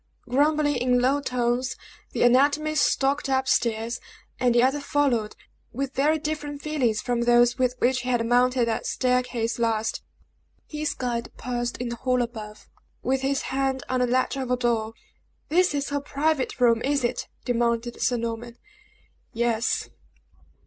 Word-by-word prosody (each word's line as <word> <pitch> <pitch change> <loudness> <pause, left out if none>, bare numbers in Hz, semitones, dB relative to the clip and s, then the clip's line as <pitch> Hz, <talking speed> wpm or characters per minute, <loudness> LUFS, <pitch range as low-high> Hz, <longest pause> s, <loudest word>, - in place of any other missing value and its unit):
Grumbling, 290 +2 +2
in 250 0 +2
low 270 +3 +2
tones, 250 -1 -1 0.4
the - - 0
anatomy 285 +5 +3
stalked 280 -1 +1
up 265 0 +1
stairs; 230 0 0 0.4
and 245 -1 +2
the 240 - +5
other 270 +3 +2
followed, 275 -7 0 0.4
with 275 +2 -3
very 295 +4 +2
different 300 -1 -4
feelings 260 -8 0
from 245 -1 0
those 240 +1 +4
with 250 -1 +1
which 255 +1 +1
he 250 - -4
had 240 -2 +1
mounted 245 0 +3
that 225 - -2
staircase 250 -2 0
last. 225 -1 0 0.6
His 305 0 -3
guide 240 -2 -3
paused 240 -1 -3
in 245 -1 -3
the 235 - -5
hall 250 0 +1
above, 215 -3 -8 0.4
with 265 0 0
his 270 0 0
hand 270 0 0
on 255 - 0
the 250 - +2
latch 255 +2 +1
of 260 -2 -3
a 250 - +2
door. 225 -2 0 0.5
"This 355 -1 +3
is 280 0 -2
her 285 0 -1
private 290 -1 -1
room, 230 -2 +4
is 280 0 0
it!" 240 - -1 0.2
demanded 235 -1 0
Sir 245 - +2
Norman. 235 +1 -5 0.8
"Yes." 235 0 0
250 Hz, 155 wpm, -25 LUFS, 235-275 Hz, 0.8 s, the